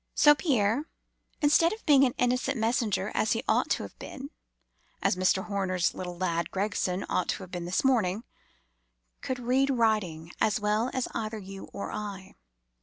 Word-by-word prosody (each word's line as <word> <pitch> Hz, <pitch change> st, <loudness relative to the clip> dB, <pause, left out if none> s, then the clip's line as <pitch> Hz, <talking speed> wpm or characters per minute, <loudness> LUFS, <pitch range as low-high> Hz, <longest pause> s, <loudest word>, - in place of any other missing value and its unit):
So 295 Hz, -, +7 dB
Pierre, 270 Hz, -, +1 dB, 0.5 s
instead 325 Hz, +4 st, +4 dB
of 445 Hz, -, -10 dB
being 280 Hz, -3 st, +6 dB
an 250 Hz, -, -1 dB
innocent 250 Hz, +2 st, +1 dB
messenger, 220 Hz, -3 st, 0 dB
as 215 Hz, -, +2 dB
he 225 Hz, -, -2 dB
ought -, -, +2 dB
to -, -, 0 dB
have -, -, -9 dB
been—(as 280 Hz, -, -6 dB
Mr. 185 Hz, +1 st, +2 dB
Horner's 190 Hz, -3 st, 0 dB
little 180 Hz, -1 st, -6 dB
lad 170 Hz, -2 st, -1 dB
Gregson 190 Hz, -1 st, -1 dB
ought 180 Hz, -, -1 dB
to -, -, -2 dB
have 185 Hz, -, -12 dB
been 175 Hz, -1 st, -4 dB
this 180 Hz, +2 st, 0 dB
morning)—could 180 Hz, -, -4 dB
read 255 Hz, +3 st, +1 dB
writing 210 Hz, -10 st, 0 dB
as 220 Hz, +2 st, +2 dB
well 210 Hz, +3 st, +1 dB
as 260 Hz, -2 st, -1 dB
either 220 Hz, -1 st, -3 dB
you 195 Hz, -1 st, -8 dB
or -, -, -6 dB
I. 200 Hz, -3 st, -6 dB
210 Hz, 160 wpm, -28 LUFS, 185-250 Hz, 0.5 s, So